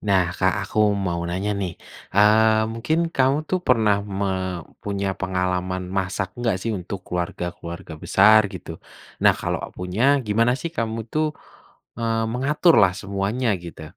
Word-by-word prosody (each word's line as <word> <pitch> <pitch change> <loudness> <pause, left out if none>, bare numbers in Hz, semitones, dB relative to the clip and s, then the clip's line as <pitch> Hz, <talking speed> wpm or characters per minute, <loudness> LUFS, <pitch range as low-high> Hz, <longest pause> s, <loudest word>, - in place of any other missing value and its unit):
Nah, 95 -4 +2
Kak, 95 0 +1
aku 105 - -5 0.3
mau 85 -1 -1
nanya 95 +4 -2
nih, 90 -3 -2 0.4
eee, 110 +1 +5
mungkin 120 +8 -1 0.2
kamu 135 +2 +3
tuh 185 - 0
pernah 110 -5 +4 0.2
me 100 - 0 0.6
punya 100 -1 -2
pengalaman 90 0 -1
masak 95 0 -1
nggak 115 -5 +1
sih 115 - -1
untuk 90 +1 -7
keluarga-keluarga 85 -1 -5
besar 105 +3 +6
gitu? 90 -3 -9 0.5
Nah, - - +7
kalo - - -1 0.2
punya 90 +4 -3 0.2
gimana 115 +3 +3
sih 170 - -4
kamu 115 0 -2
tuh, 155 0 +1 0.7
eee, 115 -1 0
mengaturlah 135 - +4
semuanya 100 +5 -2 0.2
gitu? 85 -2 -9
100 Hz, 140 wpm, -23 LUFS, 90-115 Hz, 0.7 s, Nah